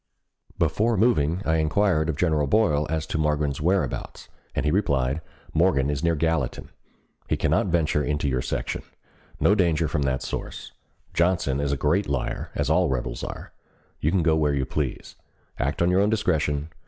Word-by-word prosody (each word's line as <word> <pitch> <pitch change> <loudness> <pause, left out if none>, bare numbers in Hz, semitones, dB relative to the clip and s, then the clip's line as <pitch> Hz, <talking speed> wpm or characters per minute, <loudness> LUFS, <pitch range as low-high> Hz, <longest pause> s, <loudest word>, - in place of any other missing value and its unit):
Before 115 +1 +1
moving, 90 -5 +2
I 80 0 +2
inquired 80 0 +2
of 80 - 0
General 75 0 +1
Boyle 75 -5 +2
as 80 0 -1
to 80 - -3
Morgan's 75 -2 0
whereabouts, 90 +3 -1 0.3
and - - -1
he 75 - +2
replied: 70 -6 +1 0.3
"Morgan 80 -5 +2
is 70 +1 -3
near 85 -1 +2
Gallatin. 80 -4 -1 0.6
He - - +1
cannot - - +1
venture 80 -4 +1
into 75 0 -1
your 65 -2 0
section. - - -3 0.6
No 100 - +4
danger 85 -5 +2
from 75 -1 -1
that 65 -2 0
source. - - -6 0.4
Johnson 85 -6 +1
is 70 -1 0
a 70 - 0
great 80 +7 +1
liar, 70 -3 -2
as - - 0
all - - +3
rebels 60 -2 -3
are. - - -7 0.5
You 75 - +1
can 90 0 +1
go 80 0 +3
where 75 -2 +1
you 70 -1 0
please. - - -4 0.4
Act 70 +6 0
on 90 - +3
your 95 +2 +4
own 105 - +3
discretion. 80 -8 0
80 Hz, 175 wpm, -25 LUFS, 70-85 Hz, 0.6 s, No